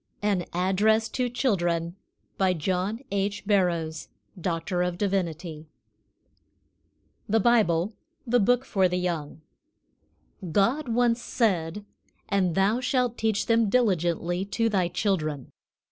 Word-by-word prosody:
AN 200 -4 +1
ADDRESS 205 +5 +2
TO 250 -1 -1
CHILDREN. 175 -9 0 0.4
BY 190 -1 +3
JOHN 185 +6 -1
H. 200 +1 -2
BARROWS, 175 -6 0 0.3
D.D. 175 -2 -2 1.6
THE 225 +2 +3
BIBLE 210 -4 +2 0.3
THE 245 0 +3
BOOK 245 +4 +2
FOR 190 -6 +2
THE 180 0 -2
YOUNG. 165 -4 -3 1.1
GOD 240 - +1
once 240 0 +2
said: 200 -5 -1 0.4
"And 190 -5 +1
thou 200 +5 +2
shalt 250 -2 0
teach 220 -2 0
them 230 -2 +3
diligently 175 -5 +1
to 225 +3 0
thy 190 -4 +1
children." 165 - -2
195 Hz, 105 wpm, -26 LUFS, 175-225 Hz, 1.6 s, BY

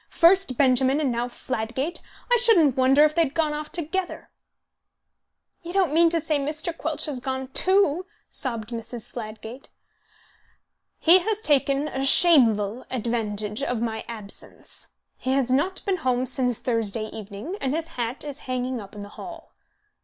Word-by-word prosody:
First 340 -6 +4
Benjamin, 265 +1 +3
and 285 -4 0
now 240 +1 -1
Fladgate! 255 +5 -4 0.3
I - - +6
shouldn't 375 - +4
wonder 265 +3 +5
if 305 0 +3
they 335 - +2
had 295 -3 -1
gone 310 -2 +1
off 300 0 -6
together." 355 +3 -3 1.3
"You 345 +1 -8
don't 375 -6 +2
mean 335 +1 +5
to 335 0 +1
say 310 -2 0
Mr. 305 +4 -3
Quelch 310 -2 -2
has 290 -5 -3
gone 260 +1 -4
too?" 370 +1 +3 0.2
sobbed 230 -5 -3
Mrs. 230 0 -7
Fladgate. 225 +2 -8 1.3
"He 345 +3 +6
has 425 +3 -1
taken 285 -4 +2
a 270 -2 -3
shameful 245 - +5
advantage 215 -3 -2
of 250 -4 -1
my 220 -1 -3
absence. 215 -4 -6 0.3
He 260 - -1
has 265 -2 +1
not 345 +9 0
been 390 -2 0
home 255 -5 0
since 250 -2 0
Thursday 225 -3 -1
evening, 210 - -7
and 270 +2 -1
his 325 0 -3
hat 245 -4 -4
is 290 -1 -6
hanging 255 -1 -2
up 200 +1 -12
in 205 - -7
the 205 - -10
hall." 335 - -11
265 Hz, 160 wpm, -24 LUFS, 235-320 Hz, 1.3 s, I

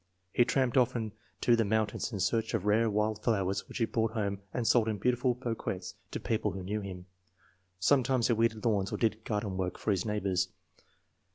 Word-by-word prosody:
He 120 - +5
tramped 130 0 +1
often 120 -3 +2 0.3
to 120 - +5
the 115 - +2
mountains 110 +2 0
in 105 - -4
search 115 +4 +1
of 100 -3 -2
rare 110 +2 +3
wild 105 0 0
flowers 100 -4 0
which - - -6
he 115 - +2
brought 115 0 0
home 100 -3 -1
and 125 - -2
sold 115 -1 +4
in 110 -2 0
beautiful 125 +2 +1
bouquets 115 -7 -4 0.2
to - - -4
people 105 -3 -1
who 95 0 -5
knew 105 +3 -2
him. 90 -2 -7 0.7
Some 130 +9 +4
times 125 -1 +1
he 120 - +3
weeded 115 -1 +1
lawns 100 -4 +1
or - - -2
did 110 -1 0
garden 105 -3 -2
work 90 -1 -2
for 110 - -1
his 95 -2 +1
neighbors. 95 -4 0
110 Hz, 200 wpm, -31 LUFS, 100-115 Hz, 0.7 s, He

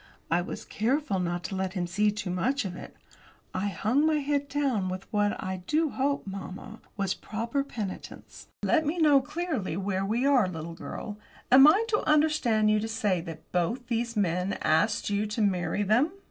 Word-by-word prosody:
I 170 +2 +3
was 210 +5 -6
careful 245 -1 0
not 175 -1 -2
to 195 - -4
let 190 0 -2
him 180 -3 -1
see 205 +5 +1
too 210 -2 -3
much 235 +8 0
of 180 -2 -4
it. - - -10 0.6
I 190 +2 -1
hung 215 +7 0
down 305 - +4
my 315 - +3
head 280 -7 0
with 185 +1 -5
what, 205 0 +2
I 190 0 -3
do 315 -1 +1
hope, 280 +1 -1
mamma, 195 +3 -8 0.2
was 195 -2 0
proper 230 +6 -3
penitence. 215 -8 -7 0.2
"Let 315 - +3
me 310 +3 -1
know, 295 -4 +5
clearly, 290 - -3
where 195 -1 -1
we 225 +6 0
are, 265 -8 +4
little 165 -1 -6
girl. 205 +4 -7 0.3
Am 270 +3 +9
I 400 +9 +5
to 425 - +2
understand 295 -9 +3
you 215 - +3
to 220 - -3
say 205 -5 0
that 165 -1 -10
both 230 +9 -1
these 235 -1 -1
men 180 0 0
asked 205 +7 +2
you 205 +1 0
to 210 +2 -3
marry 185 0 0
them?" 240 - +3
215 Hz, 190 wpm, -28 LUFS, 185-275 Hz, 0.6 s, Am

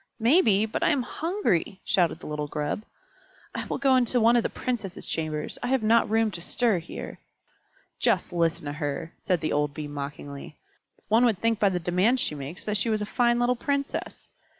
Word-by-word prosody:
"Maybe, 225 - +4
but 220 - -3
I - - +4
am 280 -5 +2
hungry!" 240 - -1
shouted 185 -8 +2
the - - -10
little 150 -1 -3
Grub. 150 +6 -2 0.7
"I - - -4
will - - -2
go 270 -1 +4
into 250 -1 +2
one 230 +1 +5
of 240 - +5
the - - -1
Princesses' 220 -8 -4
chambers; 155 -1 -3
I - - -2
have 260 -2 +1
not 230 +1 +4
room 225 0 +2
to 170 - -6
stir 225 +1 +1
here." 165 - -8 0.8
"Just 215 -9 +1
listen 170 -1 0
to 145 - -3
her!" 150 +2 -4
said 180 -4 0
the 155 - -1
old 145 -1 0
Bee 150 -1 -5
mockingly. 145 0 -7 0.5
"One 225 +4 +4
would 225 -5 +2
think 225 +1 +1
by 205 - +4
the 180 -2 -1
demands 185 +9 +2
she 155 - 0
makes 145 +4 -7
that 210 0 0
she 220 +3 +1
was 215 -1 0
a - - -2
fine 240 +2 +2
little 245 +1 +2
Princess. 280 +3 -3
210 Hz, 200 wpm, -26 LUFS, 160-240 Hz, 0.8 s, one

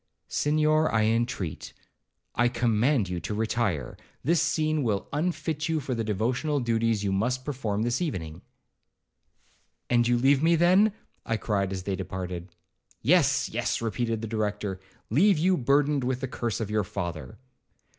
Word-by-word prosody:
'Senhor, 155 +1 +2
I 110 -1 +2
entreat,—I 115 +1 -3
command 120 0 +2
you 90 -1 -3
to 90 +5 -4
retire; 110 - -1 0.3
this 165 +3 +3
scene 155 -1 +1
will 105 -6 -1
unfit 160 0 -1
you 160 -1 +1
for 135 -2 -3
the 115 -2 -1
devotional 125 +8 0
duties 115 -3 +1
you 100 - 0
must 125 +6 -1
perform 110 -7 -2
this 120 +5 0
evening.' 85 - -4 1.5
'And 120 -1 +4
you 120 0 +3
leave 135 +3 +4
me 165 +1 +4
then?' 185 +6 +5 0.3
I 115 - -1
cried 100 -3 -1
as 95 -1 -4
they 95 0 -2
departed. 90 -1 -5 0.5
'Yes,—yes,'—repeated 120 -6 +1
the - - -2
Director; 105 -3 -2 0.3
'leave 185 - +4
you 185 +4 +3
burdened 140 0 +2
with 130 0 -1
the 135 - -2
curse 115 -4 -3
of 105 -2 -3
your 105 -1 +1
father.' 85 -6 -5
120 Hz, 145 wpm, -27 LUFS, 105-145 Hz, 1.5 s, then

